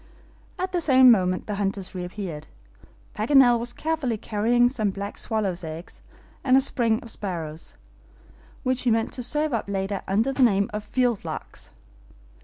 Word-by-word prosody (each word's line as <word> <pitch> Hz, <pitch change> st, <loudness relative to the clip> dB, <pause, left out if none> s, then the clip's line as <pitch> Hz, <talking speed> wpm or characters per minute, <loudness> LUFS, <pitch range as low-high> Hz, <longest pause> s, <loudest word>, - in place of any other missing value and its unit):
At 370 Hz, +1 st, -3 dB
the 355 Hz, -1 st, 0 dB
same 260 Hz, -4 st, +7 dB
moment 185 Hz, -4 st, +1 dB
the 210 Hz, -, -4 dB
hunters 195 Hz, -1 st, -2 dB
reappeared. 180 Hz, -3 st, -6 dB, 0.7 s
Paganel 245 Hz, +2 st, +5 dB
was 240 Hz, +1 st, -2 dB
carefully 300 Hz, -7 st, -2 dB
carrying 230 Hz, +4 st, +2 dB
some 225 Hz, -5 st, -1 dB
black 200 Hz, +1 st, -5 dB
swallows' 195 Hz, -5 st, -2 dB
eggs, 160 Hz, +2 st, -8 dB, 0.4 s
and 260 Hz, -1 st, +5 dB
a -, -, +5 dB
string 235 Hz, -4 st, +1 dB
of 230 Hz, -, -7 dB
sparrows, 165 Hz, -6 st, -6 dB, 0.9 s
which 255 Hz, -1 st, 0 dB
he 250 Hz, -, +1 dB
meant 225 Hz, 0 st, +1 dB
to 255 Hz, -, -4 dB
serve 300 Hz, +4 st, -1 dB
up 220 Hz, -3 st, -2 dB
later 195 Hz, 0 st, -2 dB
under 220 Hz, +8 st, +1 dB
the 270 Hz, -, -1 dB
name 200 Hz, -5 st, +3 dB
of 210 Hz, 0 st, -3 dB
field 245 Hz, -5 st, 0 dB
larks. -, -, -7 dB
220 Hz, 160 wpm, -25 LUFS, 195-255 Hz, 0.9 s, same